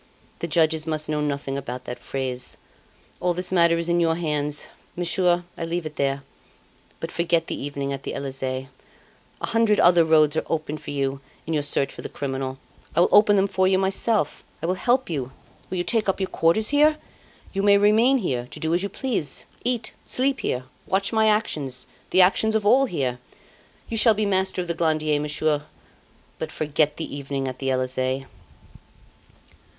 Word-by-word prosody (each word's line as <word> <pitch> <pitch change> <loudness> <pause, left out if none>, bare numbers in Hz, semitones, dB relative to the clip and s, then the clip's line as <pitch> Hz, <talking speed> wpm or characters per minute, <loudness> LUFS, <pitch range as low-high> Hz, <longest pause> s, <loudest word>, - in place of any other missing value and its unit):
The 170 - -3
judges 160 -1 +2
must 155 -1 -1
know 150 -1 0
nothing 140 -2 -2
about 125 -2 -6
that 125 - -6
phrase. 130 -2 -4 0.6
All 180 -1 0
this 180 +1 -1
matter 170 -2 +4
is 170 0 -1
in 170 0 +2
your 165 -1 +2
hands. 150 -3 -1 0.3
Monsieur, 175 0 +1
I - - -5
leave 170 0 -2
it 155 -1 -6
there; 140 -1 -1 0.8
but - - -5
forget 170 -1 +1
the - - -5
evening 140 -1 -3
at 135 - -5
the - - -5
Elysee. 135 -1 -4 0.7
A - - 0
hundred 225 -2 +2
other 175 -1 +6
roads 155 -2 +4
are 160 - +1
open 155 -1 -2
to - - -7
you 135 -1 -2 0.2
in 165 - -3
your 150 - +1
search 145 -1 0
for - - -9
the - - -6
criminal. 135 -1 -4 0.4
I - - +5
will - - +4
open 205 0 +6
them 195 0 +3
for 190 -1 +2
you 190 0 +3
myself. 195 -1 0 0.2
I - - -4
will 180 - +1
help 245 +7 +1
you. 135 -6 -4 0.4
Will 185 - -3
you 175 - 0
take 220 0 +1
up 195 - 0
your 190 - -1
quarters 170 +7 +2
here? 300 +2 +4 0.6
You 195 - 0
may 200 0 +6
remain 220 +6 +4
here 125 - -2
to - - -9
do 160 +1 0
as 175 - +2
you 200 - -2
please. 210 - -3 0.2
Eat 240 -2 -1
sleep 270 +1 +1
here 125 - -2 0.2
watch 195 +3 0
my 220 0 +4
actions 150 - 0 0.2
the 185 - +5
actions 220 +4 +2
of 215 -2 +1
all 260 +6 +5
here. 130 - -2 0.7
You 225 - -3
shall 220 0 +5
be 215 +1 0
master 190 -2 0
of - - -10
the 170 - -1
Glandier, 155 -2 +1
Monsieur; 150 0 0 0.7
but 160 0 -4
forget 150 -1 0
the 160 - -5
evening 140 -1 -3
at 130 -1 -5
the 135 - -1
Elysee. 130 +1 -1
165 Hz, 190 wpm, -24 LUFS, 140-195 Hz, 0.8 s, other